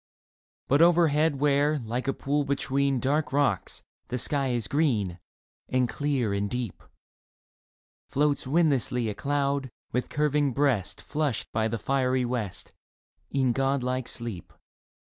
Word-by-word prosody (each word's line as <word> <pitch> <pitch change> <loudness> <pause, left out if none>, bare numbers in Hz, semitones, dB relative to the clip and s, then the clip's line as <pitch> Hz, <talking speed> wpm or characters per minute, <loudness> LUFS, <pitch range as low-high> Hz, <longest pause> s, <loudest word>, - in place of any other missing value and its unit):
But 140 +4 +4
overhead 160 -3 +4
where, 145 +1 +3
like 120 +1 -4
a 135 - +2
pool 145 +1 0
between 140 -1 0
Dark 145 +5 0
rocks, 135 -9 0 0.2
the 125 - -2
sky 140 +2 +1
is 120 -4 0
green 110 - 0 0.5
And 130 -1 +2
clear 135 -6 -1
and 100 0 -1
deep, 125 0 -4 1.3
Floats 145 -1 +1
windlessly 135 -6 +2
a - - -2
cloud, 140 +1 -1 0.2
with 125 - -1
curving 145 -2 +1
breast 130 -8 0
Flushed 150 -6 -2
by 110 0 +1
the 115 +1 -2
fiery 130 0 +1
west, 110 -7 -4 0.6
In 130 -2 +1
god 135 +1 +1
like 125 0 -2
sleep 115 -7 -4
135 Hz, 130 wpm, -27 LUFS, 120-145 Hz, 1.3 s, But